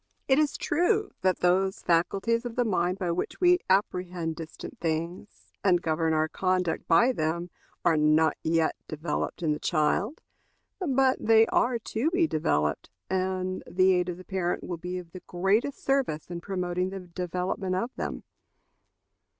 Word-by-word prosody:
It 265 +1 +4
is 300 -2 +1
true 400 +6 +1
that 185 -1 +1
those 190 +2 +2
faculties 195 +7 +1
of 240 -2 -6
the 245 - +1
mind 180 -3 0
by 180 -3 -1
which 170 - -3
we 360 0 +5
apprehend 180 -4 0
distant 160 -1 -9
things 170 +4 -4
and 180 -3 +4
govern 160 -1 0
our 155 0 +2
conduct 185 0 -1
by 170 +10 +5
them 170 -3 -2 0.3
are 165 -2 +4
not 155 +1 +4
yet 165 0 +1
developed 155 +2 -3
in 155 - +2
the 150 - -1
child; 185 - 0 0.6
but 270 -7 +2
they 225 0 +6
are 240 +1 +1
to 230 +5 -1
be 350 0 +2
developed, 115 - 0 0.2
and 185 0 -1
the 185 +1 +4
aid 180 0 +1
of 175 - -4
the 185 - -12
parent 180 -2 -2
will 175 - -4
be 180 +2 -5
of 175 -2 -9
the 185 - -9
greatest 200 +10 0
service 260 - 0
in 170 -1 -5
promoting 180 -1 -2
the 195 0 -6
development 180 +1 -3
of 235 +7 -2
them. - - -4
180 Hz, 160 wpm, -27 LUFS, 170-220 Hz, 0.6 s, they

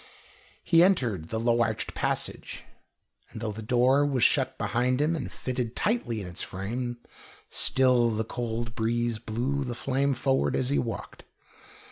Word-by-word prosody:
He 165 -1 +5
entered 120 - +1
the 110 - -2
low 120 +1 +2
arched 110 -1 -1
passage, - - -3 0.7
and - - -8
though 110 -1 -2
the 110 +2 -6
door 125 +5 +3
was 135 -5 +1
shut - - +3
behind 125 +2 0
him 155 +3 +2
and 150 - -4
fitted 125 -2 -3
tightly 170 - 0
in 100 - -5
its 90 0 -6
frame, 120 +6 -4 0.5
still 125 -3 +3
the 110 0 -1
cold 115 0 -4
breeze 115 0 0
blew 125 +5 -2
the 125 -2 -4
flame 135 +2 0
forward 135 +2 +1
as 130 +1 0
he 145 - +2
walked. 115 - -5
120 Hz, 155 wpm, -27 LUFS, 115-130 Hz, 0.7 s, He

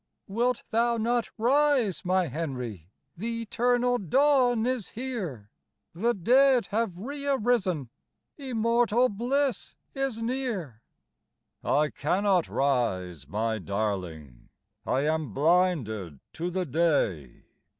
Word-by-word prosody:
"Wilt 235 +4 0
thou 235 +1 +2
not 235 +1 0
rise, 255 - +2
my 185 0 +2
Henry? 125 - -5 0.3
The 230 +5 -3
eternal 245 +2 +1
dawn 250 - +3
is 250 -5 -1
here; 195 - -5 0.4
The 230 +8 0
dead 255 +6 +4
have 215 -4 -1
re 280 +8 -6
arisen, 210 - +1 0.4
Immortal 240 -2 +1
bliss 255 +6 -1 0.2
is 270 -4 -2
near." 225 - -3 0.8
"I 150 -1 +2
cannot 185 +3 +1
rise, 95 - -1
my 110 +6 -1
darling, 90 - -4 0.4
I 130 - +1
am 155 -6 -1
blinded 140 - +1
to 170 +2 -3
the 185 +1 -2
day. 130 - 0
195 Hz, 105 wpm, -27 LUFS, -, 0.8 s, dead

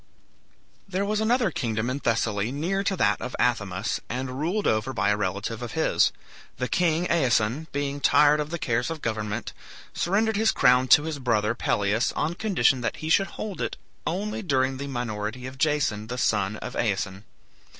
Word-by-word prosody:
There 190 +1 -1
was 210 +1 0
another 225 -2 +2
kingdom 115 -5 -2
in 130 +3 -2
Thessaly 110 -3 0
near 175 +8 -1
to 195 - +1
that 105 -8 +2
of 125 - -5
Athamas, 100 -5 0
and 130 +1 -4
ruled 185 +7 -1
over 110 +5 +1
by 105 - +1
a - - +3
relative 105 +3 -3
of 120 - -6
his. 160 0 +3 0.5
The 125 - -1
king 170 +1 +1
Aeson, 130 -3 +1
being 145 0 -2
tired 150 +2 +5
of 150 0 -2
the 170 - -3
cares 120 -3 -1
of 165 -2 -6
government, 105 -2 -3 0.4
surrendered 210 +4 +1
his 220 +1 +3
crown 125 +1 +4
to 145 +4 +7
his 155 -2 -4
brother 115 -4 +1
Pelias 105 -1 +1
on 155 +3 -1
condition 180 - +2
that 115 - -2
he 155 - -5
should 195 +4 +4
hold 210 -3 -5
it - - -3 0.3
only 210 +5 -2
during 135 -7 +1
the 140 +1 -5
minority 120 -2 -4
of 130 0 -8
Jason, 145 -9 +1
the 125 +2 -5
son 105 -3 +1
of - - -7
Aeson. 100 -3 -1
130 Hz, 180 wpm, -26 LUFS, 110-165 Hz, 0.5 s, to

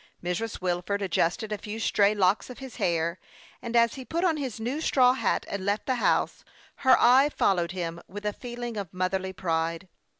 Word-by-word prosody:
Mrs. 180 +6 -3
Wilford 185 +3 -1
adjusted 185 +3 0
a 210 - -2
few 215 +1 -6
stray 210 -2 +3
locks 195 +3 +2
of 250 - -9
his 265 -3 -9
hair, 170 -4 0 0.4
anrl 235 -1 -5
as 235 -1 +4
he 265 - -7
put 335 +7 -2
on 335 -4 +2
his 260 -7 -4
new 250 +7 -2
straw 255 -5 +4
hat, 265 - 0
and 200 -1 -4
left 200 +2 -1
the 260 - +1
house, - - +1 0.3
her 260 -1 +5
eye 260 +4 +6
followed 180 -10 +1
him 170 -2 -4
with 205 +3 -8
a 210 - 0
feeling 240 -1 -6
of 195 -5 -5
motherly 190 +1 -1
pride. 165 -1 -2
205 Hz, 195 wpm, -27 LUFS, 180-245 Hz, 0.4 s, eye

